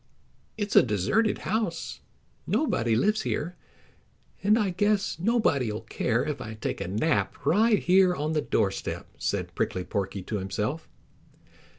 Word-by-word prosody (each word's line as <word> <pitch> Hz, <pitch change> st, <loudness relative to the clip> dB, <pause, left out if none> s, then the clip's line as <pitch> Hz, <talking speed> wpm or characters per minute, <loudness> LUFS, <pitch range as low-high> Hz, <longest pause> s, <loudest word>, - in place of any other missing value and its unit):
"It's 205 Hz, -1 st, -2 dB
a -, -, +10 dB
deserted 120 Hz, -, +1 dB
house. 220 Hz, +2 st, -2 dB, 0.5 s
Nobody 115 Hz, -, +1 dB
lives 210 Hz, -, +2 dB
here, 170 Hz, +4 st, -2 dB, 0.9 s
and 210 Hz, +3 st, +4 dB
I 205 Hz, -5 st, +1 dB
guess 205 Hz, 0 st, +1 dB
nobody'll 145 Hz, -, +1 dB
care 115 Hz, +2 st, -1 dB
if 150 Hz, -2 st, -3 dB
I 110 Hz, 0 st, -6 dB
take 110 Hz, -, -4 dB
a -, -, -3 dB
nap 110 Hz, -, 0 dB
right 215 Hz, +5 st, +4 dB
here 185 Hz, 0 st, +4 dB
on 155 Hz, +1 st, -2 dB
the 155 Hz, -, +1 dB
doorstep," 100 Hz, -8 st, -1 dB
said -, -, -2 dB
Prickly 90 Hz, -, -1 dB
Porky 95 Hz, 0 st, -3 dB
to 105 Hz, +2 st, -3 dB
himself. 105 Hz, +11 st, -3 dB
155 Hz, 135 wpm, -27 LUFS, -, 0.9 s, a